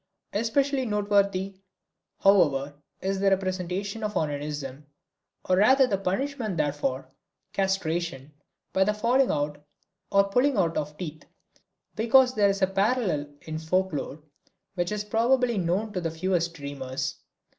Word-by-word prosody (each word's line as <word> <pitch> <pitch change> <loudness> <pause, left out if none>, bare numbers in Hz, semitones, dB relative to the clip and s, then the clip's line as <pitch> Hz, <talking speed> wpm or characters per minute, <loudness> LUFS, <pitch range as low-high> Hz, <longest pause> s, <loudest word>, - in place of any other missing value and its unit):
Especially 265 +5 +1
noteworthy, 200 -3 0 0.6
however, 145 -8 +4 0.3
is 195 0 -1
the 195 0 +3
representation 190 +2 -2
of 210 0 -3
onanism, 145 -2 -3 0.6
or 185 - +2
rather 260 +7 +6
the 200 -6 -1
punishment 215 +1 -2
therefor, 145 -3 -1 0.5
castration, 170 -7 -1 0.4
by 190 - +4
the 210 +2 0
falling 245 +5 +2
out 145 0 -2 0.5
or 200 0 +4
pulling 250 +5 +2
out 170 -4 +1
of 150 0 -3
teeth, 160 -4 -7 0.7
because 250 +3 +4
there 205 -3 +3
is 195 0 0
a - - +8
parallel 195 - 0
in 155 0 -5
folk 185 +3 0
lore 150 +1 -5 0.5
which 175 -1 -2
is 210 0 -2
probably 235 +2 +2
known 190 +5 -1
to 180 - -2
the 165 - -1
fewest 170 0 -1
dreamers. 140 -3 -4
190 Hz, 135 wpm, -27 LUFS, 155-210 Hz, 0.7 s, a